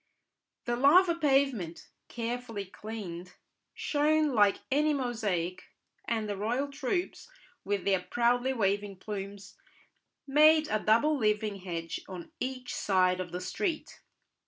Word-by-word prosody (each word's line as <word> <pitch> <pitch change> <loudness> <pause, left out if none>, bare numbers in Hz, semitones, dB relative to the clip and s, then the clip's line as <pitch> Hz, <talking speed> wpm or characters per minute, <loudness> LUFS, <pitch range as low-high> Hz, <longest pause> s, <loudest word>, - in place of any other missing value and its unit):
The 240 - 0
lava 340 +8 +5
pavement, 270 - 0 0.2
carefully 230 -3 -4
cleaned, 185 -3 -8 0.4
shone 300 0 +1
like 205 -3 +3
any 300 +2 +3
mosaic, 210 -9 -2 0.4
and 220 -2 -1
the 205 - -2
royal 240 +8 -1
troops, 300 - -3 0.3
with 200 -1 -2
their 195 -2 +3
proudly 245 +5 +1
waving 205 -3 0
plumes, 195 0 -7 0.7
made 305 +2 +5
a 215 - +1
double 230 +9 +3
living 215 -4 0
hedge 170 -3 -5
on 185 - -8
each 255 -1 -4
side 185 -2 +2
of 180 -2 -5
the 180 - -4
street. 335 - -3
225 Hz, 120 wpm, -30 LUFS, 195-275 Hz, 0.7 s, lava